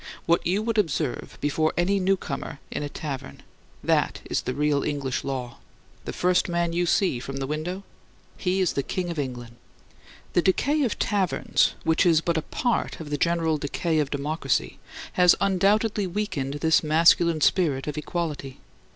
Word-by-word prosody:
What 170 0 +2
you 195 +4 +1
would 225 -1 0
observe 155 -7 -2
before 155 +2 +1
any 195 +3 +2
newcomer 185 -7 -2
in - - -3
a 145 - -3
tavern 140 -3 -6 0.4
that - - +1
is - - -1
the 130 - -4
real 150 -1 +1
English 140 -3 -2
law. 125 -3 -4 0.5
The - - -3
first 180 0 +1
man 170 -1 0
you 175 +1 +1
see 180 -8 +2
from 135 +2 -6
the 135 - -2
window, 160 +7 -4 0.5
he 185 0 0
is 185 - +1
the 140 - 0
King 175 +5 -3
of 165 - -4
England. 120 -4 -5 0.8
The 175 - +4
decay 280 - +2
of 250 -6 0
taverns, 195 -4 +1
which 160 +2 +3
is 165 -2 +5
but 170 +1 -1
a 160 - +1
part 240 +8 -1
of 155 -2 -8
the - - +1
general 165 -2 +1
decay 155 +3 -1
of 145 -2 0
democracy, 150 +3 -1 0.3
has 180 -1 +6
undoubtedly 200 +2 +2
weakened 170 -8 -3
this 160 +2 +3
masculine 165 +1 +4
spirit 145 -6 +2
of 150 - -4
equality. 150 -4 -4
165 Hz, 170 wpm, -25 LUFS, 145-180 Hz, 0.8 s, has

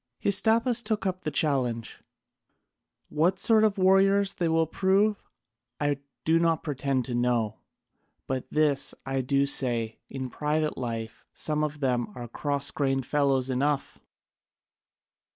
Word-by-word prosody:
Hystaspas 230 +4 +3
took 215 -2 -2
up 185 -1 -2
the 155 - -2
challenge: 130 -6 -1 1.1
"What 170 +5 +1
sort 220 +2 +4
of 215 -1 +2
warriors 195 +1 +4
they 170 -2 -1
will 165 0 +2
prove 195 +5 +1 0.6
I 145 -1 0 0.3
do 165 +1 +3
not 165 -1 +1
pretend 140 -4 -1
to 125 - -4
know, 120 -3 0 0.7
but 130 -1 -3
this 150 -3 +1
I 135 0 -1
do 140 +2 +1
say, 120 -5 0
in 130 -2 -5
private 150 +1 -1
life 115 -3 -5
some 150 0 -1
of 150 -1 -4
them 125 -3 0
are 120 -1 -7
cross 140 +3 -1
grained 135 -2 -1
fellows 135 -3 +1
enough. 135 +2 -1
145 Hz, 135 wpm, -27 LUFS, 130-180 Hz, 1.1 s, sort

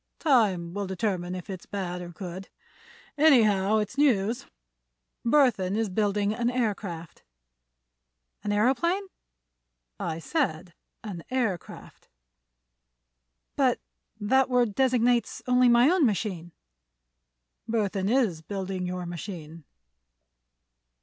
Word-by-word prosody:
"Time 200 - +2
will 200 0 -3
determine 185 -2 -2
if 180 +1 -7
it's 190 -3 -8
bad 180 -3 -4
or 175 - -7
good. 185 +1 -8 0.7
Anyhow, 220 -9 +5
it's 210 +5 -2
news. 235 -6 +2 0.8
Burthon 230 -8 +3
is 225 -2 0
building 205 +1 0
an 240 +1 0
aircraft." 205 -9 -3 1.2
"An 210 - -3
aëroplane?" 265 - +2 1.0
"I 160 -1 -3
said 175 - -2 0.3
an 190 -7 -6
aircraft." 235 -9 -4 1.5
"But - - +2 0.4
that 265 +5 +2
word 245 -4 +2
designates 245 -1 +1
only 250 0 +4
my 240 +2 +6
own 355 0 +3
machine." 190 -7 -1 1.2
"Burthon 200 -3 0
is 225 -10 +1
building 190 0 -4
your 180 0 -4
machine." 170 -3 -8
205 Hz, 100 wpm, -27 LUFS, 180-245 Hz, 1.5 s, my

